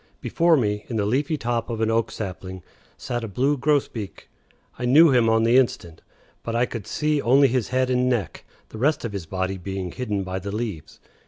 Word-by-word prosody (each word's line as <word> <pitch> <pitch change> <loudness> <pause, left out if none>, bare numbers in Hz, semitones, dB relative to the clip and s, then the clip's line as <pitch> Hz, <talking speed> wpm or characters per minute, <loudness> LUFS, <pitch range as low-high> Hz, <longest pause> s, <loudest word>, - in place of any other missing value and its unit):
Before 170 -1 +2
me, 105 -4 -1
in 120 - -4
the 105 -2 0
leafy 140 +8 0
top 120 -3 -2
of 115 -2 -3
an 110 0 +1
oak 115 0 +1
sapling, 95 -2 -7 0.3
sat 120 -1 -4
a - - -3
blue 130 +8 +1
grosbeak. 135 -7 -2 0.5
I 125 - -2
knew 150 +5 +6
him 120 -3 +4
on 110 0 +3
the 115 +2 +4
instant. 85 -10 0 0.4
But 115 - -4
I 120 +1 +3
could 115 -5 -7
see 150 -1 0
only 135 +3 +5
his 125 -2 0
head 130 0 0
and 125 0 +2
neck, 115 -9 -2 0.3
the 110 - -9
rest 145 +1 +1
of 110 - -5
his 95 -5 -5
body 95 +2 -3
being 95 0 -5
hidden 105 -4 -3
by 95 0 -4
the 100 +2 -6
leaves. 100 -9 -5
115 Hz, 210 wpm, -23 LUFS, 100-130 Hz, 0.5 s, knew